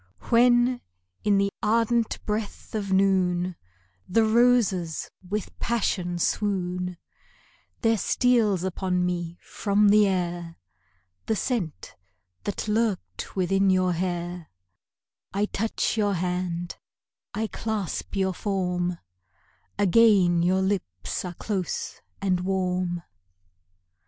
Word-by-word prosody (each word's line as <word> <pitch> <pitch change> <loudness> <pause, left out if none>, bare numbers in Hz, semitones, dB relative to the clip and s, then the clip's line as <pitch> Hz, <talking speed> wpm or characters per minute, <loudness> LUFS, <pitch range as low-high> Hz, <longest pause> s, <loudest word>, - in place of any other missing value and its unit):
When, 240 +1 +4 0.4
in 205 -1 +3
the 200 0 +2
ardent 230 +1 +1
breath 210 -1 -4
of 205 -3 -2
noon, 185 -2 +2 0.5
The 225 +5 +4
roses 220 -8 +2 0.2
with 210 0 -3
passion 185 -6 -1
swoon; 180 -1 -1 0.8
There 225 -2 +3
steals 220 -5 +2
upon 185 -1 0
me 175 -1 -3
from 205 0 +2
the 210 0 +6
air 175 -3 -2 0.7
The 220 - +1
scent 210 - -3 0.5
that 205 - -3
lurked 215 -3 -1
within 195 +1 +2
your 185 -1 +3
hair; 175 -1 -3 0.9
I 205 +1 +2
touch 220 +3 -1
your 205 -2 +2
hand, 180 -1 -2 0.6
I 220 +1 0
clasp 215 -4 -3
your 190 -1 +1
form 180 -3 -1 0.8
Again 200 -4 +5
your 185 +2 +2
lips 175 - -2
are 180 -1 -6
close 190 -4 -3 0.2
and 185 -2 +1
warm. 180 -2 -1
190 Hz, 100 wpm, -26 LUFS, 180-210 Hz, 0.9 s, the